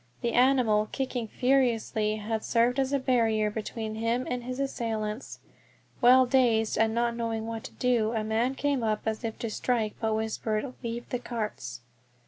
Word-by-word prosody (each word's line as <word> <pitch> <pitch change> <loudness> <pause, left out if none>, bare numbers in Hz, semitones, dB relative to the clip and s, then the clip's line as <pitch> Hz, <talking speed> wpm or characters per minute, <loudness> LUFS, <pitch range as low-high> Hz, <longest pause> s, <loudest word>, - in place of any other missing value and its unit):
The 235 -1 -1
animal, 245 -5 +3
kicking 255 -4 -2
furiously, 235 -4 +1
had 215 +1 -3
served 240 +3 +2
as 265 0 +1
a 280 - +3
barrier 225 -5 +2
between 220 0 -4
him 230 +3 -1
and 250 -1 -3
his 255 +2 -5
assailants. 225 -4 -3 0.6
While 255 +1 +7
dazed 240 -4 +3
and 220 0 +2
not 235 0 +1
knowing 225 -1 -2
what 225 -1 -5
to - - -9
do 240 -3 +1
a 220 -2 -1
man 225 +5 0
came 285 -2 0
up 215 -1 0
as 220 +2 -2
if 225 -1 -3
to 230 - -4
strike, 225 -2 0
but 220 -1 0
whispered, 220 +2 -2
"Leave 235 -1 -5
the 250 - -2
carts." 215 - -5
230 Hz, 170 wpm, -28 LUFS, 220-250 Hz, 0.6 s, While